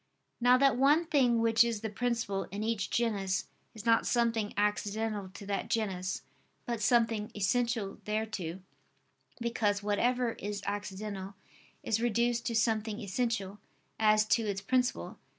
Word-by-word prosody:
Now 245 +1 +6
that 270 -2 +4
one 290 +6 +4
thing 265 -7 +3
which 225 0 +5
is 230 -3 -2
the 220 - -3
principle 225 -3 -1
in 205 +2 -5
each 220 -2 -1
genus, 200 -6 0 0.3
is 220 0 -9
not 230 -1 +4
something 230 -3 +1
accidental 210 0 -1
to 200 - -9
that 200 0 -3
genus, 190 -5 -2 0.4
but 235 -4 -3
something 225 -1 +2
essential 225 0 0
thereto: 210 -5 -3 0.8
because 215 -4 0
whatever 240 +4 +1
is 205 -2 -5
accidental 200 -1 -5 0.5
is 225 0 0
reduced 235 0 +1
to 230 - -1
something 220 -1 +1
essential, 205 -2 -2 0.4
as 215 -1 +4
to 235 - +4
its 195 -1 -2
principle. 250 +5 -1
220 Hz, 135 wpm, -31 LUFS, 205-235 Hz, 0.8 s, Now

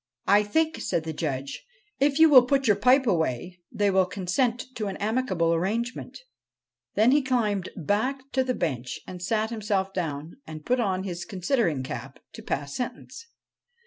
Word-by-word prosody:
' - - -53
I - - +4
think,' 315 +10 0
said 165 - -1
the 160 0 -4
Judge, 140 -4 -4 0.2
' - - -40
if 280 +1 +2
you 320 0 +8
will 275 -5 +9
put 275 0 +2
your 210 -4 +5
pipe 255 +6 +4
away, 175 - -1
they 205 -1 +1
will 190 -1 +3
consent 220 +7 -1
to 215 -4 -3
an 195 - -4
amicable 205 -7 0
arrangement* 220 +9 -2 0.8
Then 220 +4 +5
he 290 +2 +4
climbed 215 -8 0
back 255 - -1
to 260 - +2
the 255 -1 -1
bench 130 -7 -3
and 180 -1 -9
sat 215 +4 0
himself 200 -3 -1
down, 160 - -4
and 155 -1 -9
put 250 +1 +1
on 190 -5 0
his 175 -3 -5
considering 185 - 0
cap - - -7 0.2
to - - -9
pass 140 0 -3
sentence. 460 - -6
205 Hz, 175 wpm, -26 LUFS, 175-250 Hz, 0.8 s, will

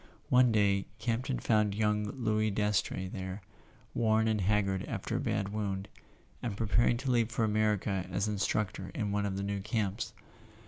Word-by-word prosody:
One 125 -1 +6
day 100 -2 +2
Campton 120 +3 -1
found 105 -3 +2
young 105 0 +1
Louis 110 -1 0
Dastrey 105 -2 0
there, 95 +1 -6 0.5
worn 110 -1 +3
and 110 -2 +1
haggard 95 -1 +1
after 110 +4 -3
a - - -1
bad 110 -7 -1
wound, 100 -2 -3 0.5
and 110 -5 -3
pre¬ 115 - -1
paring 120 +2 +4
to 130 +1 -1
leave 115 -2 +3
for 115 -1 +1
America 105 -3 +1
as 100 +3 0
instructor 100 -2 -1
in 105 -2 -1
one 100 0 0
of 95 -1 -3
the 100 - -2
new 100 0 -2
camps. 105 -2 -2
105 Hz, 170 wpm, -31 LUFS, 100-110 Hz, 0.5 s, One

